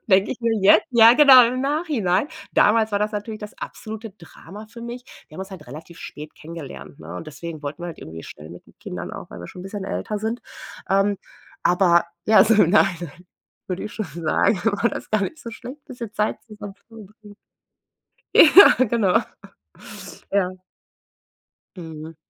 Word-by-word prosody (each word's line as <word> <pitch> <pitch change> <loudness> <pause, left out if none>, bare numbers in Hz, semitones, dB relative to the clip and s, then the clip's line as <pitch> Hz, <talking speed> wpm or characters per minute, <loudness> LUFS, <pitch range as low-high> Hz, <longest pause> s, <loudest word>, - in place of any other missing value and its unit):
Denke 195 -1 +3
ich 250 - -6
mir 230 -1 0
jetzt, 205 +2 +5
ja 235 -1 +7
genau, 265 -3 +8
im 255 +1 -3
Nachhinein. 275 - 0 0.2
Damals 220 0 +3
war 200 - 0
das 210 0 0
natürlich 215 +1 -6
das 210 - -10
absolute 220 0 -8
Drama 190 +3 -13
für 235 +1 -12
mich. 240 +1 -7 0.2
Wir - - -18
haben 175 - -7
uns 190 - -8
halt 185 -6 -11
relativ 160 +6 -11
spät 150 +1 -10
kennengelernt, 160 -3 -10
ne? - - -9
Und 165 - -8
deswegen 155 +2 -8
wollten 145 +4 -7
wir - - -4
halt 165 - -9
irgendwie 80 +1 -10
schnell 75 +1 -12
mit 85 - -13
den - - -23
Kindern - - -7
auch, - - -9
weil - - -10
wir 85 - -9
schon 180 - -10
'n - - -12
bisschen 195 +1 -6
älter 210 +1 -4
sind. 225 +3 -3 0.5
Ähm, 195 +1 +2 0.5
aber 175 -1 +4 0.2
ja, 215 +1 +6
so 225 +1 +3
im 190 -5 +4
Nachhinein, 175 -3 0 0.4
würde 185 0 -4
ich 210 - -7
schon 215 -2 -4
sagen, 170 +4 +1
war 225 +1 +1
das - - -8
gar 215 -2 +1
nicht 315 +10 -5
so 230 - -8
schlecht, 260 +6 -11
bisschen 235 -5 -9
Zeit 210 0 -1
zusammen 210 -3 -10
zu 200 - -37
verbringen. 215 -2 -15 1.0
Ja, 320 -5 +8
genau. 225 -4 +2 1.1
Ja. 195 -2 +1 1.3
Mhm. 160 -2 -9
205 Hz, 185 wpm, -22 LUFS, 175-225 Hz, 1.3 s, genau